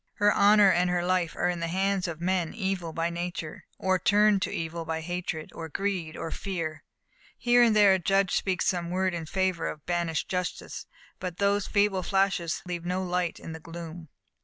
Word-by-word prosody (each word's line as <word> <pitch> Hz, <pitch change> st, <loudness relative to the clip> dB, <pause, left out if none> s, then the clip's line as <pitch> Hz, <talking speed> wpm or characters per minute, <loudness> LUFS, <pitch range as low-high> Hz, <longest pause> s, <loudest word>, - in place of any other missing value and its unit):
Her 205 Hz, 0 st, +3 dB
honour 205 Hz, -1 st, +6 dB
and 180 Hz, +1 st, +2 dB
her 175 Hz, 0 st, 0 dB
life 180 Hz, -2 st, +1 dB
are 175 Hz, -, 0 dB
in 175 Hz, -1 st, -1 dB
the 170 Hz, -, -2 dB
hands 190 Hz, +2 st, 0 dB
of 165 Hz, -2 st, -5 dB
men 180 Hz, 0 st, 0 dB
evil 190 Hz, -5 st, -2 dB
by 165 Hz, +1 st, -1 dB
nature, 170 Hz, -2 st, -5 dB
or 185 Hz, -1 st, +1 dB
turned 210 Hz, +1 st, +4 dB
to -, -, 0 dB
evil 165 Hz, +1 st, -4 dB
by 160 Hz, 0 st, -3 dB
hatred, 175 Hz, -2 st, -4 dB
or 160 Hz, -1 st, -7 dB
greed, 180 Hz, -3 st, -2 dB
or 165 Hz, -, -4 dB
fear. 165 Hz, -5 st, -4 dB, 0.5 s
Here 245 Hz, 0 st, +4 dB
and 230 Hz, -3 st, +5 dB
there 205 Hz, -2 st, +7 dB
a 190 Hz, -, +2 dB
judge 195 Hz, +2 st, +2 dB
speaks 185 Hz, -2 st, 0 dB
some 175 Hz, -3 st, 0 dB
word 185 Hz, +1 st, 0 dB
in 165 Hz, -2 st, -4 dB
favour 190 Hz, 0 st, 0 dB
of 150 Hz, -, -7 dB
banished 170 Hz, -2 st, -1 dB
justice, 180 Hz, -1 st, -4 dB, 0.3 s
but 180 Hz, -2 st, -5 dB
those 200 Hz, 0 st, +1 dB
feeble 200 Hz, -2 st, +2 dB
flashes 190 Hz, -3 st, 0 dB
leave 175 Hz, -1 st, -4 dB
no 180 Hz, +2 st, -1 dB
light 180 Hz, -1 st, -1 dB
in -, -, -8 dB
the 160 Hz, -, -7 dB
gloom. 165 Hz, 0 st, -9 dB
180 Hz, 195 wpm, -28 LUFS, 170-195 Hz, 0.5 s, there